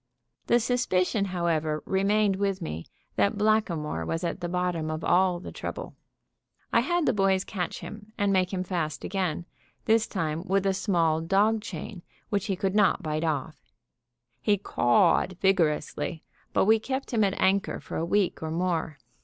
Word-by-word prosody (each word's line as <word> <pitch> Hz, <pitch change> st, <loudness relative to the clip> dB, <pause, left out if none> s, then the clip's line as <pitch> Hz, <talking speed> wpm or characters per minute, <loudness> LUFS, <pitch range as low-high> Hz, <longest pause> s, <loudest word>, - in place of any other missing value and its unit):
The 240 Hz, -, +4 dB
suspicion, 215 Hz, -5 st, +1 dB
however, 165 Hz, -4 st, -1 dB
remained 200 Hz, +1 st, +2 dB
with 195 Hz, -1 st, 0 dB
me 80 Hz, -, -5 dB, 0.3 s
that 100 Hz, -, +2 dB
Blackamoor 195 Hz, -, +1 dB
was 165 Hz, -, -3 dB
at 175 Hz, +2 st, -3 dB
the 175 Hz, -, -3 dB
bottom 180 Hz, -3 st, -1 dB
of 155 Hz, 0 st, -4 dB
all 180 Hz, 0 st, +3 dB
the -, -, -8 dB
trouble. -, -, -6 dB, 0.8 s
I -, -, +6 dB
had 345 Hz, -2 st, +1 dB
the -, -, +3 dB
boys 195 Hz, -2 st, +2 dB
catch 180 Hz, -4 st, -4 dB
him 210 Hz, 0 st, -9 dB
and 205 Hz, -2 st, +2 dB
make 185 Hz, -1 st, +2 dB
him 185 Hz, -2 st, -2 dB
fast 170 Hz, -5 st, -3 dB
again, 180 Hz, -4 st, -2 dB, 0.4 s
this 225 Hz, +1 st, +3 dB
time 160 Hz, -4 st, -2 dB
with 195 Hz, +1 st, +1 dB
a 195 Hz, -, +3 dB
small 170 Hz, -5 st, +1 dB
dog 205 Hz, +6 st, +2 dB
chain, 195 Hz, -3 st, -7 dB, 0.3 s
which 200 Hz, -2 st, -1 dB
he 195 Hz, -, 0 dB
could 190 Hz, +1 st, -1 dB
not 205 Hz, -3 st, +3 dB
bite 155 Hz, 0 st, -2 dB
off. 155 Hz, -1 st, -2 dB, 0.8 s
He 205 Hz, +6 st, +3 dB
cawed 180 Hz, +2 st, +2 dB
vigorously, 165 Hz, -3 st, 0 dB, 0.3 s
but -, -, +2 dB
we 220 Hz, +2 st, +5 dB
kept 265 Hz, +3 st, -4 dB
him 220 Hz, -2 st, +3 dB
at 195 Hz, -1 st, 0 dB
anchor 195 Hz, +1 st, +2 dB
for -, -, -8 dB
a -, -, -1 dB
week 190 Hz, +2 st, +1 dB
or 160 Hz, -, -3 dB
more. 165 Hz, -2 st, -1 dB
185 Hz, 170 wpm, -27 LUFS, 165-205 Hz, 0.8 s, I